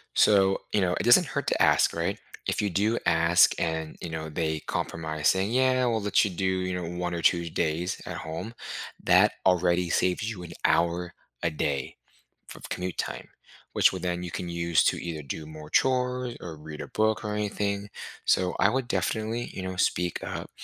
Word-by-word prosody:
So, 95 Hz, -2 st, +4 dB
you 105 Hz, -, +3 dB
know, 90 Hz, -1 st, +1 dB
it -, -, -1 dB
doesn't 150 Hz, +8 st, +6 dB
hurt 140 Hz, 0 st, -3 dB
to -, -, +1 dB
ask, -, -, +4 dB
right? 90 Hz, +5 st, -1 dB, 0.3 s
If -, -, 0 dB
you 105 Hz, -, 0 dB
do 105 Hz, +6 st, +1 dB
ask 85 Hz, +1 st, +5 dB
and, 80 Hz, -1 st, -2 dB
you 85 Hz, -, -5 dB
know, 80 Hz, -1 st, -5 dB
they 80 Hz, -1 st, -2 dB
compromise 80 Hz, -2 st, -2 dB
saying, 95 Hz, +3 st, +2 dB
yeah. 130 Hz, 0 st, +3 dB
We'll 115 Hz, -3 st, +1 dB
let 105 Hz, -1 st, +3 dB
you 100 Hz, -, -2 dB
do, 95 Hz, +2 st, -2 dB
you 95 Hz, 0 st, 0 dB
know, 90 Hz, -1 st, -4 dB
1 90 Hz, 0 st, -2 dB
or 85 Hz, -, -3 dB
2 85 Hz, -1 st, +2 dB
days 80 Hz, +3 st, -1 dB
at -, -, -5 dB
home, 80 Hz, +9 st, -6 dB, 0.5 s
that -, -, +5 dB
already 90 Hz, -1 st, +3 dB
saves 90 Hz, +6 st, +1 dB
you 95 Hz, -6 st, -6 dB
an 85 Hz, 0 st, -9 dB
hour 85 Hz, +1 st, +1 dB, 0.3 s
a 85 Hz, -, +1 dB
day 70 Hz, -3 st, -2 dB, 0.5 s
f -, -, -9 dB
of -, -, -10 dB
commute 90 Hz, -1 st, -4 dB
time, -, -, -4 dB, 0.5 s
which -, -, +5 dB
would 95 Hz, -, -5 dB
then 90 Hz, 0 st, -2 dB
you 85 Hz, -, -5 dB
can 90 Hz, -, -4 dB
use 85 Hz, -1 st, +1 dB
to -, -, +3 dB
either 80 Hz, -3 st, -5 dB
do 75 Hz, +2 st, -6 dB
more 75 Hz, -1 st, -10 dB
chores 125 Hz, -1 st, +1 dB
or 85 Hz, -2 st, -7 dB
read 75 Hz, 0 st, -9 dB
a -, -, -6 dB
book 110 Hz, 0 st, 0 dB
or 105 Hz, -, -2 dB
anything. 100 Hz, -1 st, -2 dB, 0.4 s
So 90 Hz, -1 st, +2 dB
I 100 Hz, -, +5 dB
would 130 Hz, +1 st, -1 dB
definitely, 115 Hz, 0 st, -1 dB
you -, -, -5 dB
know, 95 Hz, 0 st, -4 dB
speak 90 Hz, -1 st, 0 dB
up -, -, -5 dB
90 Hz, 200 wpm, -27 LUFS, 85-105 Hz, 0.5 s, doesn't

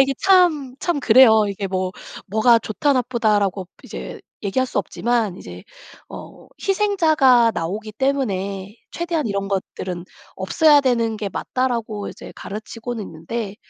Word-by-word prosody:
이게 270 Hz, 0 st, +3 dB
참, 345 Hz, -9 st, +3 dB
참 345 Hz, -5 st, -1 dB
그래요. 220 Hz, -3 st, +6 dB
"이게 200 Hz, 0 st, -4 dB
뭐 185 Hz, -1 st, -2 dB, 0.3 s
뭐가 220 Hz, +4 st, +4 dB
좋다 255 Hz, +7 st, 0 dB
나쁘다."라고 210 Hz, -7 st, 0 dB, 0.2 s
이제 -, -, -8 dB, 0.2 s
얘기할 240 Hz, +6 st, 0 dB
수 -, -, -3 dB
없지만 230 Hz, -6 st, -1 dB
이제 -, -, -11 dB, 0.4 s
어 -, -, -11 dB
"희생자가 315 Hz, -, +3 dB
나오기 210 Hz, +6 st, -4 dB
때문에 205 Hz, -6 st, -2 dB
최대한 335 Hz, -4 st, -2 dB
이런 200 Hz, -2 st, -2 dB
것들은 185 Hz, -2 st, -4 dB, 0.3 s
없어야 290 Hz, -, +4 dB
되는 235 Hz, -4 st, 0 dB
게 210 Hz, -1 st, -4 dB
맞다."라고 230 Hz, -2 st, -3 dB
이제 -, -, -11 dB
가르치고는 225 Hz, +2 st, -6 dB
있는데 195 Hz, +6 st, -6 dB
230 Hz, 300 characters per minute, -21 LUFS, 200-265 Hz, 0.4 s, 그래요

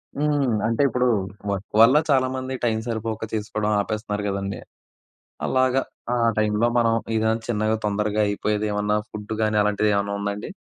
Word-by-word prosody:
హ్మ్. 145 Hz, -3 st, +1 dB, 0.2 s
అంటే 115 Hz, +4 st, 0 dB
ఇప్పుడు 125 Hz, +1 st, +1 dB, 0.4 s
వర్క్ 100 Hz, +1 st, -5 dB
వల్ల 130 Hz, +6 st, +7 dB
చాలామంది 130 Hz, -1 st, +1 dB
టైమ్ 110 Hz, -1 st, +1 dB
సరిపోక 110 Hz, -1 st, -3 dB
చేసుకోవడం 105 Hz, 0 st, -1 dB
ఆపేస్తన్నారు 105 Hz, 0 st, -3 dB
గదండీ! 100 Hz, 0 st, -3 dB, 0.9 s
అలాగా 130 Hz, 0 st, +2 dB, 0.3 s
ఆ -, -, +1 dB, 0.2 s
టైమ్‌లో 110 Hz, +2 st, +2 dB
మనం 115 Hz, -1 st, +3 dB, 0.2 s
ఏదైనా 110 Hz, 0 st, +2 dB
చిన్నగా 110 Hz, -1 st, 0 dB
తొందరగా 105 Hz, +1 st, 0 dB
అయిపోయేది 105 Hz, +1 st, -1 dB
ఏమన్నా 105 Hz, +1 st, +1 dB
ఫుడ్ 105 Hz, +1 st, -6 dB
గాని 110 Hz, -1 st, +1 dB
అలాంటిది 105 Hz, +1 st, +1 dB
ఏవన్నా 100 Hz, 0 st, -1 dB
ఉందా 100 Hz, 0 st, -1 dB
అండి? 105 Hz, -, -7 dB
110 Hz, 145 wpm, -23 LUFS, 105-120 Hz, 0.9 s, వల్ల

